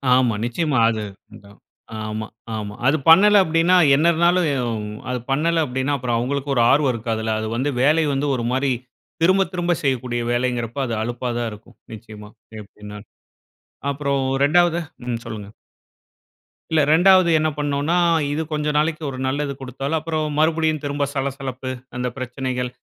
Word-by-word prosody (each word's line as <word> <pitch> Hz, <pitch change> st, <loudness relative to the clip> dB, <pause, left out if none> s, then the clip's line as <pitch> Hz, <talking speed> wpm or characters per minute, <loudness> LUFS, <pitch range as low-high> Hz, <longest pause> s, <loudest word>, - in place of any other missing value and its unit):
ஆமா. 125 Hz, -3 st, +2 dB
நிச்சயமா 145 Hz, +4 st, -1 dB
அது. 110 Hz, -2 st, -2 dB, 0.3 s
அதான். 100 Hz, 0 st, -16 dB, 0.5 s
ஆமா, 110 Hz, 0 st, -4 dB, 0.3 s
ஆமா. 105 Hz, -1 st, -5 dB
அது 145 Hz, +3 st, +3 dB
பண்ணல 205 Hz, +5 st, +7 dB
அப்டீன்னா 165 Hz, +2 st, +2 dB, 0.2 s
என்ன 155 Hz, +4 st, +3 dB
இருந்தாலும் 170 Hz, +2 st, +2 dB
எ -, -, 0 dB
யும், 115 Hz, -4 st, -3 dB, 0.2 s
அது 125 Hz, 0 st, -2 dB
பண்ணல 165 Hz, +4 st, +2 dB
அப்டீன்னா 130 Hz, +2 st, -2 dB
அப்பறம் 125 Hz, -3 st, -1 dB
அவுங்களுக்கு 140 Hz, +3 st, -2 dB
ஒரு 120 Hz, -, +3 dB
ஆர்வம் 140 Hz, -1 st, +3 dB
இருக்காதுல்ல? 110 Hz, -1 st, -2 dB
அது 110 Hz, -, -3 dB
வந்து 130 Hz, +5 st, 0 dB
வேலை 155 Hz, +4 st, +4 dB
வந்து 140 Hz, +2 st, -1 dB
ஒரு 120 Hz, -, -3 dB
மாரி 130 Hz, +1 st, +1 dB, 0.5 s
திரும்ப 190 Hz, +3 st, +4 dB
திரும்ப 175 Hz, -1 st, -1 dB
செய்யக்கூடிய 125 Hz, -3 st, -1 dB
வேலைங்கிறப்ப 120 Hz, -1 st, -2 dB
அது 115 Hz, -, -3 dB
அலுப்பா 120 Hz, +2 st, -3 dB
தான் 120 Hz, -1 st, -2 dB
இருக்கும். 110 Hz, +3 st, -14 dB, 0.2 s
நிச்சயமா 105 Hz, -1 st, -11 dB, 0.3 s
எப்டீன்னாலும். 105 Hz, 0 st, -11 dB, 0.8 s
அப்பறம் 140 Hz, -1 st, -1 dB, 0.2 s
2. 170 Hz, +3 st, +3 dB, 0.3 s
ம், 120 Hz, -2 st, -2 dB
சொல்லுங்க. 105 Hz, -2 st, -7 dB, 1.2 s
இல்ல 160 Hz, -1 st, +3 dB
2வது 185 Hz, +1 st, +5 dB
என்ன 155 Hz, 0 st, +1 dB
பண்ணோன்னா, 145 Hz, +3 st, 0 dB, 0.4 s
இது 150 Hz, +2 st, -1 dB
கொஞ்சம் 150 Hz, -1 st, -1 dB
நாளைக்கு 155 Hz, +1 st, 0 dB
ஒரு 130 Hz, -, -7 dB
நல்லது 140 Hz, +1 st, -2 dB
குடுத்தாலும், 135 Hz, +4 st, -3 dB
அப்பறம் 155 Hz, -1 st, -3 dB
மறுபடியும் 160 Hz, -1 st, +1 dB
திரும்ப 145 Hz, 0 st, -1 dB
சலசலப்பு 135 Hz, -2 st, -4 dB, 0.3 s
அந்த 125 Hz, 0 st, -2 dB
பிரச்சனைகள் 125 Hz, 0 st, -3 dB
135 Hz, 150 wpm, -21 LUFS, 120-155 Hz, 1.2 s, பண்ணல